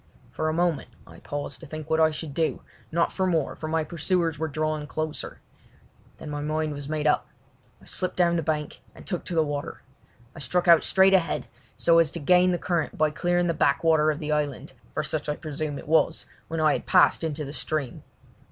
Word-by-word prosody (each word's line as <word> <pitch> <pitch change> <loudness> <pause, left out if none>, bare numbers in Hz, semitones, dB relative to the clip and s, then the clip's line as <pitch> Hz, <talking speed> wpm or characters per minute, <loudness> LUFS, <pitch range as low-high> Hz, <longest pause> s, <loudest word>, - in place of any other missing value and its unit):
For 155 - -1
a - - +1
moment 170 -1 0 0.2
I - - -14
paused 145 0 -5
to 165 - -10
think 155 0 -7
what 160 0 +1
I 160 0 +5
should 155 -1 -5
do, 160 +2 -1 0.3
not 170 +1 +1
for 190 -1 0
more, 160 -6 0
for 155 - -6
my 160 0 0
pursuers 165 0 0
were 160 - -1
drawing 155 0 -2
closer. 155 0 -4 0.8
Then 150 - -8
my 145 0 -3
mind 155 0 -1
was 145 0 -7
made 155 -1 -2
up. 150 - +2 0.5
I - - -19
slipped 185 - -2
down 170 -1 +3
the 165 - +1
bank 150 -1 -3
and - - -13
took 180 -4 -3
to 175 - -4
the 160 - +4
water. 145 -1 -5 0.5
I - - -9
struck 175 +7 0
out 170 -1 +7
straight 190 0 +4
ahead 180 -3 +2 0.3
so 165 0 +5
as 165 -3 +4
to 170 - -3
gain 180 +4 +4
the 175 - +1
current 170 -3 -2
by 155 -1 +2
clearing 175 +2 +1
the 170 - +1
backwater 155 +1 +3
of 150 - 0
the 155 -1 -4
island, 145 -3 -2 0.2
for 155 - 0
such 155 0 -3
I 150 - 0
presume 150 -2 -4
it - - -10
was, 160 +1 +2 0.2
when 165 0 -3
I 155 -1 +4
had - - -4
passed - - +4
into 155 -2 -2
the 140 - -7
stream. 150 -5 -3
155 Hz, 215 wpm, -26 LUFS, 150-170 Hz, 0.8 s, out